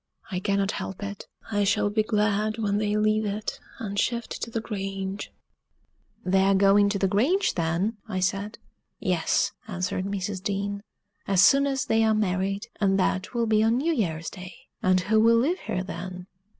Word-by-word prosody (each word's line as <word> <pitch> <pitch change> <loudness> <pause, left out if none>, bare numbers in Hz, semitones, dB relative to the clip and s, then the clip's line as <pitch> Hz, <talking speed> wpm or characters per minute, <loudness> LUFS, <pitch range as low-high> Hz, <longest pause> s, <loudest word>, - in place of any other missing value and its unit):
I 180 - -1
cannot 200 +1 0
help 190 +1 -5
it; 200 0 -6 0.2
I 205 -1 +2
shall 205 +1 +2
be 215 +1 +2
glad 215 0 0
when 205 -2 0
they 210 0 0
leave 215 0 +2
it 210 +1 -3 0.2
and 200 -2 -3
shift 235 -1 -2
to - - -3
the 225 - -2
Grange! 195 -2 -4 0.9
"They 190 +1 +3
are 195 +1 +4
going 200 +1 +5
to 200 - 0
the 195 - +1
Grange, 265 - +2
then?" 175 +6 -1
I 190 -3 -2
said. 200 +3 -1 0.4
"Yes," - - +1 0.2
answered 185 -1 -2
Mrs. 200 -1 -3
Dean, 200 0 -2 0.5
"as 195 -1 +4
soon 280 0 +6
as 270 -1 -1
they 225 0 +2
are 220 -1 +3
married; 195 0 -1
and 195 -2 +2
that 185 +4 -1
will 235 -1 +2
be 215 -1 +3
on 225 +2 +3
New 325 +6 +1
Year's 165 - -2
day." 185 -1 -9 0.3
"And 185 0 +3
who 215 +4 +2
will 230 +1 +5
live 320 +10 +1
here 185 - -3
then?" 180 -1 -7
200 Hz, 180 wpm, -26 LUFS, 190-220 Hz, 0.9 s, soon